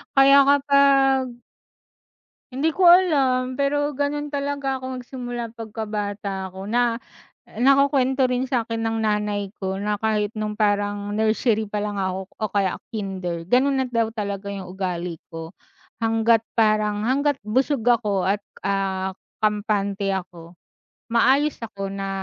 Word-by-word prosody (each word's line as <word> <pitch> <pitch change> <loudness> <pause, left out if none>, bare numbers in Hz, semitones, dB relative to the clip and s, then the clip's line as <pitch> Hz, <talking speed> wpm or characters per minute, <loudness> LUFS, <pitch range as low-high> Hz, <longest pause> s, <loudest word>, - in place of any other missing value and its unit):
kaya 275 +1 +7
kapag 275 -3 +3 1.1
Hindi 280 +6 0
ko 360 +2 +3
alam, 270 -8 +4
pero 290 +1 +1
ganun 290 +1 -2
talaga 280 -2 -2
ako 260 0 -5
nagsimula 245 -2 -6
pagkabata 210 -3 -4
ako 190 +1 -9
na 235 +3 +1 0.6
nakukwento 270 0 +3
rin 255 +1 0
sa'kin 230 -3 -1
ng 225 0 -1
nanay 210 -2 -1
ko, 190 -1 -2
na 205 +1 -2
kahit 215 -2 0
nung 215 0 -3
parang 205 -1 0
nursery 220 +1 +1
palang 205 0 -3
ako 190 0 -2
o 215 - 0
kaya 195 -2 +1 0.2
kinder 190 -6 -4
gano'n 265 +4 +3
na 255 - -4
daw 230 -2 0
talaga 200 -2 -4
yung 195 -2 -5
ugali 180 -3 -4
ko. 165 -1 -8 0.5
Hangga't 225 0 +3
parang, 215 -2 +2
hangga't 280 +4 +1
busog 255 +4 0
ako 215 -5 +2
at 200 +2 +1 0.2
ah, 190 -1 -1 0.3
kampante 205 -1 0
ako. 175 -2 -8 0.6
Maayos 275 +5 +3
ako 195 -3 -5
na 195 0 -4
220 Hz, 130 wpm, -23 LUFS, 200-260 Hz, 1.1 s, kaya